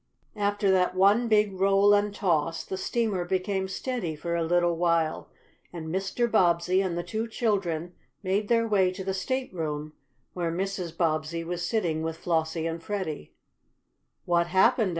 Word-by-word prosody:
After 205 -1 +1
that 185 -1 +2
one 200 +6 +4
big 210 -2 +3
roll 195 +1 +5
and 205 0 +2
toss 165 -5 0
the - - -4
steamer 200 -1 -1
became 190 +1 -1
steady 190 -5 -3
for 170 +3 -4
a 170 -1 0
little 175 +1 +2
while, 165 -2 0 0.4
and 160 -2 -6
Mr. 195 +7 -1
Bobbsey 180 -3 +3
and 180 -3 -2
the 175 - -2
two 225 +4 -3
children 190 -7 -1 0.3
made 200 +2 0
their 230 0 +2
way 195 -4 +3
to 190 +1 -6
the 190 0 -2
stateroom 170 - -3 0.4
where 170 -2 -2
Mrs. 185 -1 -3
Bobbsey 160 0 0
was 175 +1 -4
sitting 175 -7 0
with 160 0 -3
Flossie 160 -1 -1
and 165 0 -3
Freddie. 175 - -5 0.9
"What 170 0 +2
happened?" 190 +4 +3
185 Hz, 155 wpm, -27 LUFS, 170-205 Hz, 0.9 s, roll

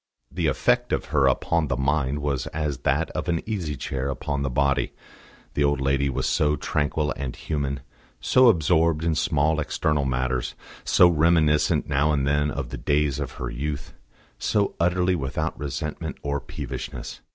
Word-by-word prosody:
The - - -1
effect - - +1
of - - 0
her 70 -3 +4
upon 80 +4 +1
the 70 - -1
mind 70 +1 0
was 70 -3 -1
as 75 -4 -3
that - - 0
of - - -3
an 85 -1 +1
easy 95 -9 -3
chair 70 0 -3
upon 70 +1 -3
the 70 - -1
body. 70 +2 +1 0.6
The 70 - +1
old 70 -1 +2
lady 70 0 +1
was 65 - -2
so 75 -1 +2
tranquil 75 +1 -1
and 65 -2 -4
human, 70 -3 -3 0.4
so 125 - +5
absorbed 80 -4 +3
in 85 -1 +2
small 75 +1 +1
external 75 -1 0
matters, 65 -1 -1 0.3
so 90 - +6
reminiscent 80 -2 +3
now 75 +2 +2
and 70 -2 +1
then 75 +1 +2
of 70 -4 -4
the - - -6
days 75 -1 +1
of 75 - -4
her - - -5
youth, 70 +3 -4 0.5
so 100 -1 +1
utterly 90 +1 +2
without 70 -6 -2
resentment 75 +2 -4
or 70 0 -1
peevishness. - - -6
75 Hz, 165 wpm, -25 LUFS, 70-80 Hz, 0.6 s, so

